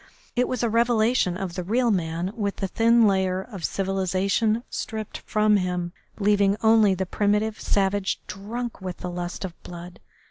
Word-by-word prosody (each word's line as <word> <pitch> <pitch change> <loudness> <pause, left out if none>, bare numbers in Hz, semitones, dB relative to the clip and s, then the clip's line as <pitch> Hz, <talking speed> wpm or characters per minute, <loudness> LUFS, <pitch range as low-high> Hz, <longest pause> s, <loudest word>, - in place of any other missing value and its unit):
It 250 +1 +2
was 255 - -2
a - - +3
revelation 230 -4 +2
of 185 -2 -4
the 180 - -3
real 235 +5 +2
man 175 0 -1
with 200 -3 -2
the 195 - -2
thin 230 +3 +4
layer 190 -2 +2
of 195 -3 -8
civilisation 195 +4 0
stripped 220 -2 -5
from 215 -1 +2
him, 180 -2 -2 0.2
leaving 205 -1 +3
only 220 -3 +5
the 190 +1 -2
primitive 210 +3 0
savage 195 0 0
drunk 225 +3 -6
with 185 -2 -5
the 180 - -5
lust 175 +2 -4
of 180 - -6
blood. 175 0 -10
200 Hz, 165 wpm, -25 LUFS, 185-220 Hz, 0.2 s, only